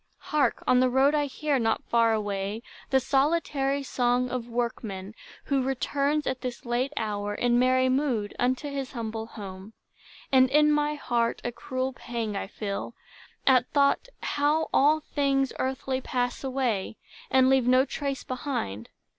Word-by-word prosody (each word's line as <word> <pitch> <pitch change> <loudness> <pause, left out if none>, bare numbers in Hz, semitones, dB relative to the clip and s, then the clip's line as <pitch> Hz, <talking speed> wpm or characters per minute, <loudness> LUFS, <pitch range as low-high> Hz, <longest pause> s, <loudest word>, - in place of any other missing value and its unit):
Hark, 300 -1 0
on 250 - +4
the 255 0 +4
road 265 +3 +4
I 295 -1 +1
hear, 285 0 -1
Not 225 -1 0
far 230 -1 +3
away, 205 0 -2 0.3
the 265 - +4
solitary 280 0 +1
song 250 -1 0
Of 245 -2 -4
workman, 220 -4 -3 0.3
who 275 -2 +1
returns 280 +3 0
at 260 -1 -2
this 250 -1 -5
late 245 +3 0
hour, 205 -1 -2
In 240 +1 +2
merry 255 +1 +3
mood, 255 -6 0
unto 255 +4 0
his 275 -2 -4
humble 225 -2 -4
home; 200 -1 -9 0.6
And 260 -1 +5
in 300 +2 +5
my 295 0 +1
heart 235 -5 0
a 240 - -2
cruel 260 +2 -3
pang 230 -4 -4
I 195 - -3
feel, 205 +2 -5 0.5
At 255 -2 +4
thought, 280 - +3 0.2
how 295 +2 +1
all 305 +3 +4
things 275 -3 0
earthly 260 0 -2
pass 245 0 -2
away, 255 -7 -1 0.3
And 260 -1 +5
leave 265 -2 +3
no 255 +1 +5
trace 280 -1 -4
behind. 250 - -4
255 Hz, 155 wpm, -27 LUFS, 230-275 Hz, 0.6 s, And